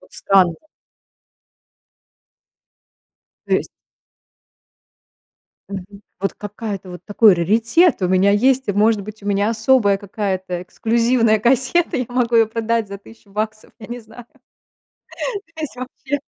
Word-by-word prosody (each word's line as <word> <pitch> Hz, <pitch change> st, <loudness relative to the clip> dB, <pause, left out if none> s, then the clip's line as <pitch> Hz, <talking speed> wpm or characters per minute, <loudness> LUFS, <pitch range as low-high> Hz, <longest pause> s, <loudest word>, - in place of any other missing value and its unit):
вот -, -, -22 dB
странно. 185 Hz, -4 st, +3 dB, 2.9 s
То -, -, 0 dB
есть -, -, -2 dB, 2.0 s
Мгм. 200 Hz, +1 st, -8 dB, 0.2 s
Вот 195 Hz, +1 st, -1 dB
какая-то 205 Hz, -2 st, -6 dB
вот 180 Hz, -1 st, -9 dB
такой 210 Hz, 0 st, +5 dB
раритет 225 Hz, -, +2 dB
у 180 Hz, -, +2 dB
меня 190 Hz, +2 st, +3 dB
есть, 260 Hz, +5 st, +2 dB
и, 205 Hz, -, +2 dB
может 210 Hz, +1 st, +2 dB
быть, 210 Hz, +1 st, -10 dB
у -, -, -10 dB
меня 205 Hz, +1 st, +1 dB
особая 220 Hz, -3 st, +3 dB
какая-то 190 Hz, -3 st, -4 dB
эксклюзивная 230 Hz, +2 st, +1 dB
кассета, 265 Hz, +10 st, +2 dB
я 250 Hz, -, -1 dB
могу 245 Hz, -1 st, 0 dB
ее 225 Hz, -1 st, +5 dB
продать 230 Hz, -1 st, -1 dB
за 200 Hz, 0 st, -7 dB
тыщу 205 Hz, 0 st, -18 dB
баксов, 215 Hz, +1 st, -3 dB
я 215 Hz, -, -10 dB
не 240 Hz, +1 st, -6 dB
знаю. 225 Hz, +2 st, -14 dB, 1.3 s
То 315 Hz, -, -6 dB
есть 305 Hz, -, -5 dB
вообще 265 Hz, +3 st, -5 dB
215 Hz, 130 wpm, -20 LUFS, 200-235 Hz, 2.9 s, такой